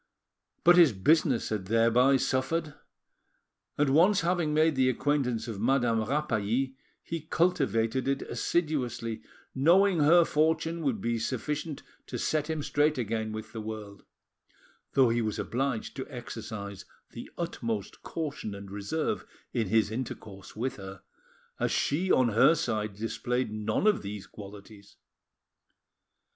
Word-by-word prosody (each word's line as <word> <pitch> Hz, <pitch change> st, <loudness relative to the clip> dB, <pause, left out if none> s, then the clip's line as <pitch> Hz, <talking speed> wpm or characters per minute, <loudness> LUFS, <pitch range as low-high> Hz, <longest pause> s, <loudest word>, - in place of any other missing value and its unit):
But 175 Hz, +1 st, +7 dB
his 165 Hz, -8 st, +7 dB
business 135 Hz, -, +2 dB
had 105 Hz, -4 st, -3 dB
thereby 115 Hz, +5 st, +4 dB
suffered, 150 Hz, +5 st, -1 dB, 1.0 s
and 145 Hz, -2 st, +2 dB
once 180 Hz, +7 st, +5 dB
having 170 Hz, -2 st, 0 dB
made 155 Hz, 0 st, +3 dB
the 130 Hz, -1 st, +3 dB
acquaintance 125 Hz, -3 st, 0 dB
of 105 Hz, -4 st, -5 dB
Madame 120 Hz, -2 st, +2 dB
Rapally, 130 Hz, -1 st, -1 dB, 0.3 s
he 165 Hz, -1 st, -4 dB
cultivated 130 Hz, -, +1 dB
it 135 Hz, 0 st, 0 dB
assiduously, 120 Hz, -5 st, -2 dB, 0.3 s
knowing 175 Hz, +6 st, +4 dB
her 165 Hz, +3 st, +6 dB
fortune 160 Hz, +2 st, +1 dB
would 130 Hz, -9 st, -1 dB
be 115 Hz, +1 st, -1 dB
sufficient 145 Hz, +6 st, -3 dB, 0.2 s
to -, -, -4 dB
set 155 Hz, 0 st, -1 dB
him 155 Hz, -2 st, -2 dB
straight 150 Hz, +1 st, +1 dB
again 110 Hz, -2 st, -2 dB
with 110 Hz, +1 st, -7 dB
the 110 Hz, -, -5 dB
world, 105 Hz, -2 st, -7 dB, 0.9 s
though 130 Hz, -3 st, +5 dB
he 115 Hz, +1 st, +1 dB
was 110 Hz, -2 st, -2 dB
obliged 125 Hz, -2 st, -2 dB
to 130 Hz, -, -5 dB
exercise 110 Hz, -6 st, -7 dB, 0.3 s
the -, -, -9 dB
utmost 115 Hz, -, -4 dB
caution 145 Hz, -10 st, -5 dB
and 100 Hz, -1 st, -10 dB
reserve 105 Hz, +11 st, -2 dB, 0.3 s
in 115 Hz, -6 st, -1 dB
has 110 Hz, 0 st, +2 dB
intercourse 110 Hz, -5 st, -7 dB
with 125 Hz, +4 st, -3 dB
her, 95 Hz, -1 st, -9 dB, 0.6 s
as -, -, 0 dB
she 175 Hz, +7 st, +1 dB
on 130 Hz, -2 st, +4 dB
her 115 Hz, +9 st, +5 dB
side 105 Hz, -8 st, -2 dB
displayed 120 Hz, +2 st, -2 dB
none 110 Hz, -, -1 dB
of 215 Hz, -1 st, +3 dB
these 100 Hz, 0 st, -6 dB
qualities. 100 Hz, 0 st, -12 dB
125 Hz, 135 wpm, -29 LUFS, 110-150 Hz, 1.0 s, But